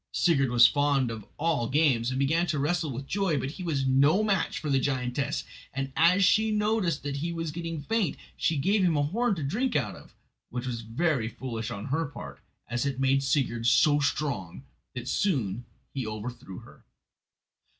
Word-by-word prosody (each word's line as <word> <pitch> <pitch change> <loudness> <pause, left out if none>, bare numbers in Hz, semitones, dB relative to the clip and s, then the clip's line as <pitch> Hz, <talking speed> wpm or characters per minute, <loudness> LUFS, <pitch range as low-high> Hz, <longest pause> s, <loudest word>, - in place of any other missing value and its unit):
Sigurd 135 -7 +2
was 120 0 +7
fond 140 -4 +2
of 110 -3 -8
all 150 -6 0
games, 130 -5 +2
and 130 - -2
began 160 +6 +1
to 155 - -1
wrestle 155 +3 0
with 130 +2 -6
joy; 190 -2 0
but 130 +1 -2
he 185 - -8
was 145 -6 -1
no 140 +9 +4
match 200 -4 0
for - - -5
the 135 -2 +2
giantess, 130 0 -1 0.3
and 135 0 -4
as 180 +4 +5
she 220 +3 +3
noticed 210 -6 0
that 140 -1 -3
he 165 +4 -2
was 165 -2 -3
getting 165 0 -5
faint 220 -3 0 0.2
she 160 - 0
gave 195 +9 +2
him 170 -4 +2
a 145 - +2
horn 220 +8 0
to 160 - -4
drink 235 - -1
out 105 -7 0
of, - - -16 0.3
which 125 +1 -4
was 120 -2 -3
very 120 +2 0
foolish 115 -1 -5
on 100 -3 -6
her 150 +4 -1
part, 70 - -9 0.3
as 120 +1 -1
it 140 -2 -2
made 135 0 +3
Sigurd 125 -4 0
so 145 +5 +5
strong 140 - -2 0.3
that - - -3
he - - -13
soon 120 - -1 0.3
overthrew 110 -4 -5
her. - - -17
140 Hz, 190 wpm, -28 LUFS, 125-165 Hz, 0.3 s, was